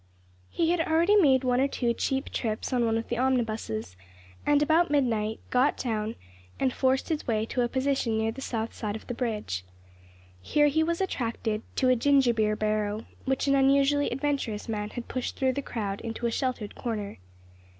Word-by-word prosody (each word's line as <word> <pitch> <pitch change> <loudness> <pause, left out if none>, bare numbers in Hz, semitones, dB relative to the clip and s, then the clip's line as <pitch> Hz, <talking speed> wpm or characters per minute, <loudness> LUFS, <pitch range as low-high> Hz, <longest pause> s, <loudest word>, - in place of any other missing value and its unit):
He 330 0 +1
had 350 -1 +2
already 330 +5 +3
made 275 -10 +5
one 250 0 +2
or 275 - +3
two 240 -4 0
cheap 270 +3 -2
trips 220 +2 -2
on 245 -2 +2
one 225 0 +1
of 225 - -4
the 240 - -2
omnibuses, 220 - -1 0.5
and, 290 0 +4
about 320 +3 +3
midnight, 225 -7 0
got 255 +3 +3
down 220 -2 -2 0.4
and 260 -2 +1
forced 260 0 +1
his 315 -2 -2
way 220 -2 +1
to 245 - -1
a 240 - +1
position 260 -4 0
near 220 0 0
the 265 +4 -9
south 225 -3 -3
side 210 -2 -4
of 220 - -8
the - - -4
bridge. 215 - -3 0.8
Here 295 - +3
he 315 +3 +2
was 335 +3 0
attracted 230 - -2
to 255 - +2
a 255 - +5
ginger 265 0 +4
beer 215 -1 +1
barrow 215 0 -1 0.2
which 265 -1 0
an 275 - +4
unusually 275 +1 +3
adventurous 270 -5 -2
man 210 -2 -3
had 240 +1 -7
pushed 255 -1 -4
through 260 -2 +2
the 280 - -2
crowd 205 -7 -4
into 230 +1 -4
a 235 - +1
sheltered 245 -4 -2
corner. 210 - -4
245 Hz, 190 wpm, -27 LUFS, 220-275 Hz, 0.8 s, made